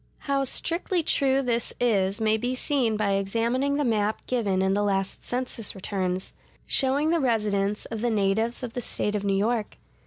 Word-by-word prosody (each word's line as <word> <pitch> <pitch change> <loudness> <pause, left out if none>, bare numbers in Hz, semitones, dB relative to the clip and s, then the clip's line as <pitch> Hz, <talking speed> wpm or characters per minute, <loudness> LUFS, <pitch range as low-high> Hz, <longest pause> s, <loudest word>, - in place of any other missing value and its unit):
How 275 -2 0
strictly 340 +5 0
true 275 -2 +2
this 235 -2 -1
is 200 -4 +2
may 220 0 +3
be 245 +3 -1
seen 250 -5 +1
by 210 -2 +1
examining 230 +8 0
the 295 - +1
map 215 -3 0
given 200 -7 0
in 190 0 +2
the 205 - +1
last 195 -2 -1
census 245 -4 -3
returns,(142) 190 -1 -2 0.3
showing 280 +4 +2
the 340 - +2
residence 210 -5 0
of 225 -2 -5
the 240 - +1
natives 220 +3 0
of 235 -2 -5
the 245 - -3
State 210 -2 -2
of 205 -1 -1
New 195 -1 +1
York. 220 +1 -1
225 Hz, 180 wpm, -26 LUFS, 200-255 Hz, 0.3 s, may